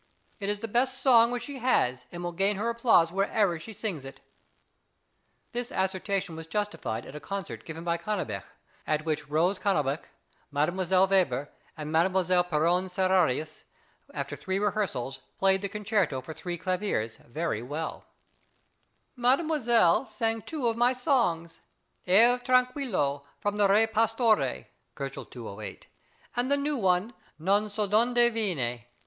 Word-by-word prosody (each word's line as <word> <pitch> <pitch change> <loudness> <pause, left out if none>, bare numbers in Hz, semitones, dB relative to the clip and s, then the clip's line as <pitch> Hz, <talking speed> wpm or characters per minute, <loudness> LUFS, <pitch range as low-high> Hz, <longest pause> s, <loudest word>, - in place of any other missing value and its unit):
It 200 0 -3
is 205 0 -2
the 225 - -3
best 255 +4 +1
song 235 -3 +6
which 245 0 -3
she 285 -2 -7
has, 130 - +1
and 175 0 -6
will 175 - -2
gain 195 +4 +1
her 215 +4 -1
applause 230 -8 +4
wherever 195 -2 +1
she 220 - -9
sings 195 -8 -4
it. 135 0 -10 1.3
This 245 0 -3
assertion 190 -1 -1
was 160 0 -8
justified 165 - -3
at 135 - -10
a - - -5
concert 195 +5 -6
given 165 0 -7
by 170 0 0
Cannabich, 210 +5 -3 0.5
at 155 0 0
which 150 -2 -2
Rose 175 +6 +2
Cannabich, 150 -7 0 0.5
Mdlle. 185 +6 +2
Weber, 160 -8 +1 0.3
and 155 0 -5
Mdlle. 180 +1 +2
Pierron 175 +4 +2
Serrarius, 180 -5 +1 0.5
after - - -4
three 190 0 -3
rehearsals, 190 - -1 0.2
played 190 0 +3
the 200 - -3
concerto 205 - 0
for 160 +5 -8
three 175 +2 -5
claviers 180 - -2
very 150 -2 -3
well: 145 +6 -5 1.1
Mdlle. 255 +6 +2 0.2
Weber 225 -8 +4
sang 225 +1 -1
two 285 0 -3
of 230 - +1
my 240 +2 +3
songs, 230 - 0 0.5
"Aer 230 +7 +6
tranquillo," 250 - +1 0.2
from 205 0 -1
the 205 -1 +4
"Re 210 +3 +5
Pastore," 225 - +1 0.3
(208 120 -6 -7
K.), - - -20 0.5
and 245 +3 0
the 285 - +4
new 290 +1 -1
one, 190 +2 +1 0.2
"Non 195 +6 +2
sö 210 0 -2
d'onde 230 +5 +2 0.2
viene." 135 - -2
190 Hz, 145 wpm, -28 LUFS, 160-225 Hz, 1.3 s, song